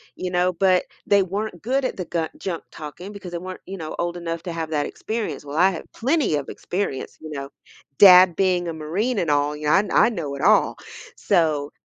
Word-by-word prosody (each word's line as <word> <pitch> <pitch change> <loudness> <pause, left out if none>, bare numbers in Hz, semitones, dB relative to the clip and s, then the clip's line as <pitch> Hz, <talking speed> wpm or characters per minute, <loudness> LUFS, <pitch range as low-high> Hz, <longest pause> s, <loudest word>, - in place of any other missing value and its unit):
you 180 - -4
know? 180 0 +2
But, 185 +1 +3 0.2
they 200 -1 +4
weren't 195 0 -4
good 260 +4 0
at - - -2
the 180 - -4
ga 165 -1 -2
junk-talking, 175 +1 -7
because 195 -3 -9
they 175 - -3
weren't, 185 +1 -8
you 195 +1 -7
know, 155 -3 -6
old 175 0 -2
enough 165 -1 -4
to 175 - -5
have 165 -1 -4
that 150 -2 0
experience- 215 -12 -4
well, 145 +1 -6
I 185 +3 +6
have 170 - -7
plenty 270 - +1
of 140 -2 -3
experience, 180 -8 -4
you 155 - -8
know? 140 -2 -6 0.5
Dad 185 -3 +9
being 180 -2 +1
a 165 - -3
Marine 195 +10 -2
and 170 - -1
all, 145 0 +1
I 150 +6 +2
I - - +5
know 165 -11 -4
it 140 - -7
all- 215 +2 +4 0.4
so, 155 -6 +1
175 Hz, 210 wpm, -23 LUFS, 155-195 Hz, 0.5 s, Dad